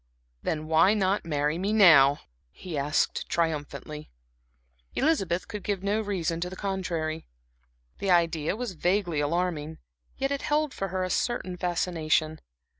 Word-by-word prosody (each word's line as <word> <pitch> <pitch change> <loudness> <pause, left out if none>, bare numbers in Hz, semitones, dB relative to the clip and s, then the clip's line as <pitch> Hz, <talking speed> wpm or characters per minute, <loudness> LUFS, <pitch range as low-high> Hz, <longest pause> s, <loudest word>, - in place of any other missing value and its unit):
"Then 155 -1 -2
why 165 +6 +4
not 195 -2 +1
marry 150 0 0
me 195 +3 -1
now," 155 -9 +6 0.3
he 175 - -8
asked, 145 +1 0
triumphantly. 155 -2 -3 0.9
Elizabeth 195 - +1
could 210 -2 -6
give 200 -2 -2
no 205 +2 +1
good 215 - -8
reason 170 -4 -1
to 180 - -2
the 185 - -8
contrary. 170 -5 -3 0.7
The 195 - -2
idea 170 -2 +2
was 240 -1 -4
vaguely 180 -1 0
alarming, 160 0 -1 0.4
yet 270 +1 -1
it 280 - -1
held 300 -1 0
for 195 - -3
her 185 0 -2
a 185 - -2
certain 240 -7 -1
fascination. 165 -3 0
175 Hz, 145 wpm, -27 LUFS, 155-195 Hz, 0.9 s, now